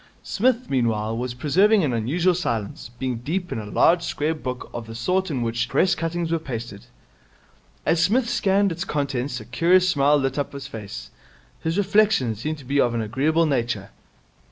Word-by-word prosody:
Psmith, 250 Hz, +3 st, +1 dB
meanwhile, 115 Hz, -4 st, 0 dB
was 120 Hz, +1 st, -3 dB
preserving 190 Hz, -, +3 dB
an 135 Hz, -5 st, 0 dB
unusual 160 Hz, +11 st, +1 dB
silence, 115 Hz, -, -3 dB
being 130 Hz, -2 st, -2 dB
deep 175 Hz, +8 st, -3 dB
in -, -, -2 dB
a 105 Hz, -, -7 dB
large 170 Hz, -, +4 dB
square 155 Hz, -1 st, -1 dB
book 130 Hz, -5 st, -5 dB
of 115 Hz, -1 st, -6 dB
the 115 Hz, -, -8 dB
sort 180 Hz, +11 st, 0 dB
in 130 Hz, -6 st, -1 dB
which 120 Hz, +1 st, -1 dB
Press 185 Hz, -, +3 dB
cuttings 165 Hz, 0 st, -2 dB
are 165 Hz, -, +1 dB
pasted. 115 Hz, -8 st, -7 dB, 1.0 s
As 165 Hz, 0 st, +2 dB
Psmith 235 Hz, +4 st, +2 dB
scanned 200 Hz, -4 st, +2 dB
its 170 Hz, +2 st, -3 dB
contents 140 Hz, -5 st, -2 dB
a 110 Hz, -, -10 dB
curious 175 Hz, +10 st, +3 dB
smile 145 Hz, -4 st, +4 dB
lit 135 Hz, 0 st, -1 dB
up 145 Hz, -, -3 dB
his 140 Hz, -1 st, -7 dB
face. 105 Hz, -3 st, -8 dB, 0.5 s
His 165 Hz, +3 st, -2 dB
reflections 200 Hz, -, +2 dB
seemed 155 Hz, +4 st, -2 dB
to 140 Hz, -, -13 dB
be 140 Hz, +2 st, +2 dB
of 120 Hz, -1 st, +1 dB
an 115 Hz, -, 0 dB
agreeable 150 Hz, +9 st, +1 dB
nature. 120 Hz, -8 st, -1 dB
140 Hz, 180 wpm, -23 LUFS, 120-175 Hz, 1.0 s, large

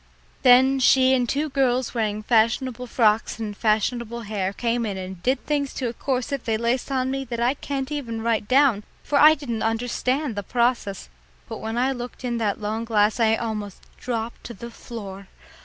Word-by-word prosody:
Then 260 Hz, +1 st, +6 dB
she 260 Hz, 0 st, +5 dB
and 250 Hz, -2 st, +1 dB
two 295 Hz, +3 st, 0 dB
girls 260 Hz, -3 st, +1 dB
wearing 215 Hz, -3 st, -1 dB
fashionable 240 Hz, +2 st, +1 dB
frocks 225 Hz, -2 st, +2 dB
and 215 Hz, -2 st, -5 dB
fashionable 230 Hz, +2 st, 0 dB
hair 205 Hz, -3 st, -2 dB
came 235 Hz, +3 st, -1 dB
in 205 Hz, -4 st, -3 dB
and 185 Hz, -1 st, -7 dB
did 255 Hz, +5 st, 0 dB
things 285 Hz, -2 st, -1 dB
to 250 Hz, -3 st, -2 dB
a -, -, -6 dB
corset 265 Hz, +1 st, -2 dB
they 225 Hz, -1 st, +1 dB
laced 235 Hz, +4 st, -1 dB
on 260 Hz, -1 st, 0 dB
me 270 Hz, 0 st, -2 dB
that 235 Hz, -1 st, -5 dB
I 240 Hz, +3 st, +2 dB
can't 275 Hz, -1 st, -4 dB
even 230 Hz, -7 st, -4 dB
write 225 Hz, -2 st, 0 dB
down, 260 Hz, -5 st, +4 dB, 0.2 s
for 285 Hz, -, +1 dB
I 310 Hz, +1 st, +8 dB
didn't 240 Hz, -7 st, -4 dB
understand 245 Hz, +4 st, -1 dB
the 205 Hz, -, -2 dB
process, 235 Hz, -3 st, -1 dB, 0.4 s
but 225 Hz, -, -6 dB
when 225 Hz, +1 st, -4 dB
I 255 Hz, +2 st, +2 dB
looked 245 Hz, 0 st, -7 dB
in 240 Hz, -1 st, -1 dB
that 210 Hz, -3 st, -1 dB
long 215 Hz, +2 st, -3 dB
glass 215 Hz, 0 st, +2 dB
I 225 Hz, -1 st, +4 dB
almost 215 Hz, -4 st, -5 dB, 0.2 s
dropped 235 Hz, -1 st, -4 dB
on 235 Hz, -, -9 dB
the 235 Hz, +4 st, -8 dB
floor. 200 Hz, -5 st, -9 dB
235 Hz, 190 wpm, -24 LUFS, 220-260 Hz, 0.4 s, I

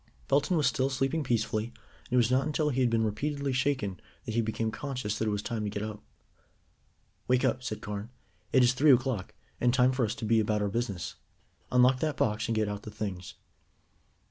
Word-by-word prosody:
Belton 145 Hz, +6 st, +3 dB
was 150 Hz, -, +2 dB
still 135 Hz, -3 st, +2 dB
sleeping 135 Hz, +3 st, 0 dB
peacefully, 110 Hz, -3 st, 0 dB
and 120 Hz, -, -12 dB, 0.4 s
it -, -, +4 dB
was 120 Hz, 0 st, +3 dB
not 130 Hz, +2 st, +2 dB
until 155 Hz, 0 st, +1 dB
he 130 Hz, -2 st, 0 dB
had 125 Hz, -, +3 dB
been 115 Hz, -1 st, +2 dB
repeatedly 140 Hz, +6 st, -1 dB
shaken 130 Hz, -8 st, 0 dB, 0.3 s
that 110 Hz, -, -4 dB
he 115 Hz, -, +2 dB
became 110 Hz, 0 st, -2 dB
conscious 125 Hz, -7 st, -3 dB
that 110 Hz, -, 0 dB
it -, -, +1 dB
was 105 Hz, 0 st, -2 dB
time 115 Hz, -3 st, -3 dB
to 105 Hz, -, -1 dB
get 105 Hz, 0 st, -4 dB
up. 105 Hz, -1 st, -6 dB, 1.3 s
"Wake 125 Hz, 0 st, +3 dB
up," 130 Hz, -, +1 dB
said 110 Hz, -4 st, -5 dB
Carne; 105 Hz, +2 st, -5 dB, 0.4 s
"it 130 Hz, -, +5 dB
is 120 Hz, 0 st, +4 dB
three 145 Hz, +4 st, +5 dB
o'clock, 125 Hz, -6 st, +1 dB, 0.2 s
and 120 Hz, -, +3 dB
time 125 Hz, 0 st, +4 dB
for 130 Hz, -1 st, 0 dB
us 110 Hz, -, -1 dB
to -, -, -5 dB
be 115 Hz, +1 st, +4 dB
about 105 Hz, -1 st, +1 dB
our 100 Hz, -, 0 dB
business. 100 Hz, -5 st, -3 dB, 0.5 s
Unlock 125 Hz, +1 st, +5 dB
that 155 Hz, -1 st, -1 dB
box, 105 Hz, -1 st, 0 dB
and 115 Hz, -, 0 dB
get 110 Hz, -1 st, +1 dB
out 105 Hz, 0 st, -4 dB
the 110 Hz, -, -8 dB
things." 100 Hz, -4 st, -5 dB
120 Hz, 215 wpm, -29 LUFS, 105-130 Hz, 1.3 s, it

